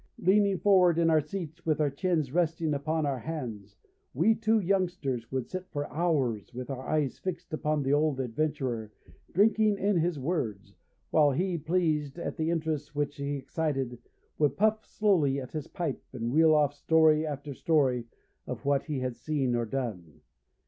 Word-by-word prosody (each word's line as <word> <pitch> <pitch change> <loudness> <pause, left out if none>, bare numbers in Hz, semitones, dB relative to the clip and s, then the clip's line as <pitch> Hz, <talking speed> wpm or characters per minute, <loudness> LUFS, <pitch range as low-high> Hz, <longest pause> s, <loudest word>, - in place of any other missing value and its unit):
Leaning 200 +1 +3
forward 180 -2 +4
in 165 -1 +3
our 155 -1 +4
seats 165 +1 -7
with 155 -2 0
our 150 -2 +2
chins 155 -2 0
resting 165 -2 +1
upon 155 +2 -1
our 135 -3 -1
hands, 120 -9 -6 0.4
we 225 - +4
two 220 0 +2
youngsters 175 - -1
would 130 -2 -2
sit 185 0 -6
for 145 -1 -3
hours, 140 - 0
with 125 +2 -5
our 130 -1 -6
eyes 150 -4 0
fixed 185 -2 -5
upon 155 -1 0
the 135 +1 +1
old 150 -2 +2
adventurer, 125 -3 -2 0.4
drinking 215 +1 +3
in 200 -1 +1
his 170 -1 +1
words, 130 - -3 0.4
while 150 -2 +5
he, 175 +6 0
pleased 155 -3 0
at 170 - -4
the 160 -1 -1
interest 155 -3 -2
which 145 0 -2
he 140 0 -2
excited, 135 -3 -2 0.4
would 145 -2 +2
puff 215 +1 +2
slowly 165 -10 +2
at 130 -2 -8
his 155 -2 -5
pipe 165 -6 -3
and 120 -1 -3
reel 160 0 +6
off 145 -2 +3
story 155 +1 +4
after 145 -2 -5
story 130 -6 +1 0.4
of - - -6
what 140 -1 +2
he 145 -5 -3
had 130 -2 -2
seen 135 0 -1
or 120 -1 -1
done. 105 - -5
150 Hz, 170 wpm, -29 LUFS, 135-170 Hz, 0.4 s, reel